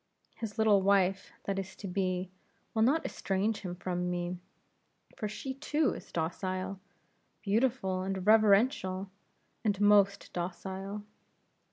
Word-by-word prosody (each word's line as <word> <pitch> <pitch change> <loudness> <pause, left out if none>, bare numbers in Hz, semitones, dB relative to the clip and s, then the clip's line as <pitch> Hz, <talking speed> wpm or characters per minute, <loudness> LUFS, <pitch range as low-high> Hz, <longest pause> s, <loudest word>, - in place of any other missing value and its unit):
His 220 -3 -5
little 215 -3 +5
wife, 195 -1 +2
that 195 -1 -1
is 190 -1 -6
to 200 - -7
be, 185 -1 -1 0.4
will 220 - +1
not 280 +8 +3
estrange 200 +3 -1
him 180 -2 -5
from 180 0 -2
me; 175 0 -2 0.8
for 215 - -3
she 265 +5 -5
too 295 +2 +1
is - - -10
docile, 185 +3 -2 0.6
beautiful, 210 -3 +1
and 190 -1 -3
reverential, 205 -3 +4 0.5
and 205 -3 +1
most 200 -1 +4
docile. 190 +3 -4
195 Hz, 125 wpm, -31 LUFS, 185-215 Hz, 0.8 s, little